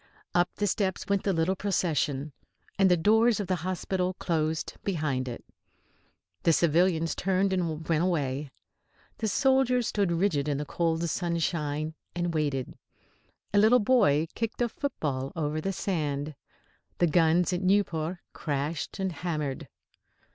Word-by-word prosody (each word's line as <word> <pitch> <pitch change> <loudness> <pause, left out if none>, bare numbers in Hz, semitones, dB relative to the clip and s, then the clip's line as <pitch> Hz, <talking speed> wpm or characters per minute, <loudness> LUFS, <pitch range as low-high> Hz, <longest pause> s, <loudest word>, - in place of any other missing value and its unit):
Up 175 0 +3
the 205 - 0
steps 190 -1 -1
went 200 -1 +1
the 200 - +1
little 170 +2 +1
procession. 155 -7 -1 0.5
And 195 -1 +5
the 180 - +4
doors 220 +6 +4
of 205 - -1
the 185 0 0
hospital 185 +1 -2
closed 160 -3 -1
behind 150 -9 -1
it. 120 - -7 1.0
The 165 - +4
civilians 165 0 +2
turned 190 +1 +1
and 165 -4 -2
went 165 0 +2
away. 145 -5 -1 0.7
The 220 - 0
soldiers 255 +2 +3
stood 200 -4 0
rigid 165 -5 +1
in 145 -2 0
the 150 - -3
cold 165 +2 0
sunshine, 160 -3 -1 0.2
and 175 -1 -1
waited. 145 -5 -1 0.8
A 205 - +5
little 220 +4 +6
boy 205 - +3
kicked 230 +2 -2
a 235 - 0
football 145 - -3
over 155 -1 -1
the 195 - -1
sand. 155 -6 -2 0.6
The 175 - +4
guns 170 +2 +3
at 180 - -1
Nieuport 185 -3 +1 0.2
crashed 145 +1 -3
and 190 -1 -1
hammered. 150 -4 -3
170 Hz, 140 wpm, -28 LUFS, 150-190 Hz, 1.0 s, little